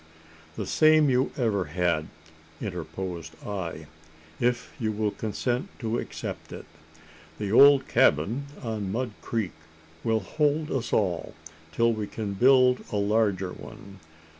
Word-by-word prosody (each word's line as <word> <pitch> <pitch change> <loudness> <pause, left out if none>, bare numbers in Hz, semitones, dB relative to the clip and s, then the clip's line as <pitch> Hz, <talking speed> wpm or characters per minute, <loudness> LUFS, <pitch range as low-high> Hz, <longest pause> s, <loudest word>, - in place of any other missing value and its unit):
"The - - -4
same 155 -2 +5
you 125 +1 +2
ever 105 -7 +1
had," 85 0 0 0.5
interposed 85 -3 -5
I, 85 -6 -5 0.5
"if 120 0 0
you 110 -3 0
will 105 0 -1
consent 120 +4 -2
to 115 -1 -2
accept - - -6
it. - - -8 0.7
The 100 -2 -3
old 140 +3 +7
cabin 105 - +2 0.2
on 110 -4 -3
Mud 120 +2 -2
Creek 110 -6 -2 0.5
will 110 -1 +1
hold 150 +7 0
us 130 -4 -2
all 90 -5 0 0.4
till 115 +8 +2
we 105 -2 -3
can 105 -2 -4
build 125 +3 +5
a - - -2
larger 100 -3 +1
one. 100 0 -12
110 Hz, 130 wpm, -27 LUFS, 95-125 Hz, 0.7 s, old